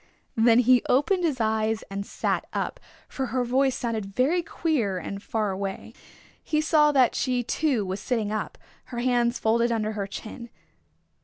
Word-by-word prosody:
Then 230 Hz, 0 st, +5 dB
he 250 Hz, 0 st, +5 dB
opened 350 Hz, +8 st, +2 dB
his 300 Hz, -7 st, 0 dB
eyes 220 Hz, 0 st, 0 dB
and 200 Hz, 0 st, -3 dB
sat -, -, -1 dB
up, -, -, -3 dB, 0.3 s
for 265 Hz, -1 st, -3 dB
her 255 Hz, 0 st, 0 dB
voice 265 Hz, +2 st, +2 dB
sounded 225 Hz, -4 st, -3 dB
very 305 Hz, +8 st, +2 dB
queer 280 Hz, -, -1 dB
and 195 Hz, +3 st, -6 dB
far 215 Hz, -2 st, -1 dB
away. 195 Hz, 0 st, -5 dB, 0.5 s
He 305 Hz, -, 0 dB
saw 305 Hz, -1 st, +4 dB
that 260 Hz, -4 st, +4 dB
she 250 Hz, -2 st, 0 dB
too 255 Hz, -4 st, 0 dB
was 190 Hz, +2 st, -3 dB
sitting 215 Hz, 0 st, -1 dB
up, 215 Hz, -, -3 dB, 0.3 s
her 240 Hz, -, -8 dB
hands 240 Hz, -1 st, +1 dB
folded 235 Hz, +2 st, +2 dB
under 215 Hz, -2 st, 0 dB
her 205 Hz, -2 st, -4 dB
chin. 230 Hz, +4 st, -8 dB
235 Hz, 165 wpm, -26 LUFS, 215-260 Hz, 0.5 s, Then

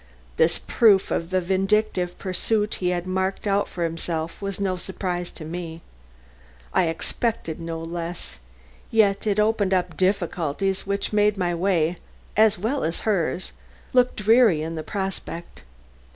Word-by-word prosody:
This 160 Hz, +1 st, +4 dB
proof 205 Hz, -5 st, +4 dB
of 165 Hz, -, -1 dB
the 185 Hz, 0 st, +2 dB
vindictive 190 Hz, 0 st, +1 dB
pursuit 210 Hz, +3 st, 0 dB
he 180 Hz, -, +1 dB
had 175 Hz, 0 st, -1 dB
marked 190 Hz, +2 st, -1 dB
out 200 Hz, 0 st, +2 dB
for 175 Hz, -, -4 dB
himself 165 Hz, 0 st, -3 dB
was 195 Hz, -1 st, -3 dB
no 190 Hz, -2 st, 0 dB
surprise 180 Hz, -1 st, -3 dB
to 155 Hz, -, -9 dB
me. 165 Hz, 0 st, -6 dB, 0.9 s
I -, -, +4 dB
expected 165 Hz, +1 st, -2 dB
no 165 Hz, -1 st, -4 dB
less, 165 Hz, -, -6 dB, 0.5 s
yet 210 Hz, -2 st, +3 dB
it 205 Hz, 0 st, +2 dB
opened 210 Hz, -3 st, +2 dB
up 180 Hz, -2 st, -1 dB
difficulties 190 Hz, -1 st, 0 dB
which 200 Hz, +1 st, -2 dB
made 210 Hz, -1 st, +3 dB
my 175 Hz, -2 st, 0 dB
way, 170 Hz, -1 st, +1 dB, 0.4 s
as 215 Hz, 0 st, +5 dB
well 235 Hz, +9 st, -1 dB
as 165 Hz, -, -2 dB
hers, 185 Hz, -3 st, 0 dB, 0.4 s
look 250 Hz, -1 st, +4 dB
dreary 215 Hz, -6 st, +4 dB
in 165 Hz, +1 st, -4 dB
the 160 Hz, -, -3 dB
prospect. 190 Hz, -2 st, -5 dB
185 Hz, 145 wpm, -24 LUFS, 170-205 Hz, 0.9 s, as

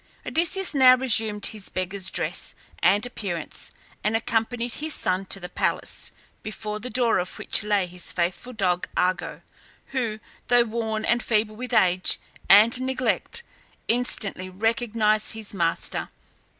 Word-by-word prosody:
Odysseus 345 Hz, +2 st, +2 dB
now 260 Hz, -2 st, +7 dB
resumed 220 Hz, -5 st, +1 dB
his 215 Hz, -3 st, -3 dB
beggar's 185 Hz, +1 st, -3 dB
dress -, -, -1 dB, 0.2 s
and 195 Hz, +6 st, +3 dB
appearance 195 Hz, -10 st, -5 dB, 0.3 s
and 210 Hz, +2 st, +1 dB
accompanied 235 Hz, 0 st, -1 dB
his 310 Hz, +1 st, +1 dB
son 185 Hz, +1 st, 0 dB
to 195 Hz, -, -2 dB
the 180 Hz, -, -7 dB
palace, -, -, 0 dB, 0.3 s
before 215 Hz, 0 st, -5 dB
the 250 Hz, +4 st, -6 dB
door 240 Hz, 0 st, +2 dB
of 180 Hz, -, -5 dB
which -, -, +2 dB
lay 205 Hz, -3 st, +1 dB
his 180 Hz, 0 st, -3 dB
faithful 180 Hz, +8 st, -2 dB
dog 185 Hz, -6 st, 0 dB
Argo, 180 Hz, 0 st, -1 dB, 0.5 s
who, 230 Hz, -5 st, -2 dB, 0.3 s
though 245 Hz, 0 st, +5 dB
worn 220 Hz, -1 st, -3 dB
and 235 Hz, +1 st, +2 dB
feeble 215 Hz, -1 st, 0 dB
with 250 Hz, +3 st, -6 dB
age 185 Hz, -5 st, +2 dB, 0.3 s
and 220 Hz, +5 st, +7 dB
neglect, 260 Hz, -, -2 dB, 0.4 s
instantly 215 Hz, -6 st, +1 dB
recognized 215 Hz, +1 st, +1 dB
his 220 Hz, -2 st, -6 dB
master. 170 Hz, -3 st, 0 dB
215 Hz, 135 wpm, -24 LUFS, 195-245 Hz, 0.5 s, now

